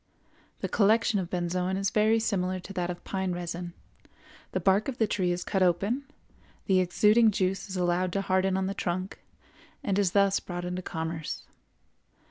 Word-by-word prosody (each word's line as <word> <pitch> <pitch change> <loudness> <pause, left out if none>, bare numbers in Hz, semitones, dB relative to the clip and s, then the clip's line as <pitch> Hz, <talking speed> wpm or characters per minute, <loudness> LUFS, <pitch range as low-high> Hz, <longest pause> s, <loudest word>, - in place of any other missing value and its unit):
The - - -1
collection 220 +1 +3
of 175 -2 -4
benzoin 180 +1 -1
is 195 0 0
very 220 +1 +3
similar 185 -4 -1
to 185 +2 -9
that 180 -2 -2
of 175 -1 -6
pine 190 -2 -2
resin; 175 0 -5 0.8
the - - -1
bark 195 +2 +3
of 265 -3 -3
the 225 - +3
tree 185 -3 0
is 175 0 -2
cut 190 - -1
open, 195 +10 +1 0.6
the 190 -1 +3
exuding 210 +5 +4
juice 195 0 -1
is 190 - -4
allowed 180 0 +1
to 195 - 0
harden 190 0 +1
on 190 - 0
the 195 - -2
trunk, 185 0 -3 0.6
and 200 -5 +1
is 190 -3 +1
thus 200 -1 +4
brought 175 -1 -6
into 180 +1 -3
commerce. 160 -2 -4
190 Hz, 175 wpm, -28 LUFS, 180-200 Hz, 0.8 s, exuding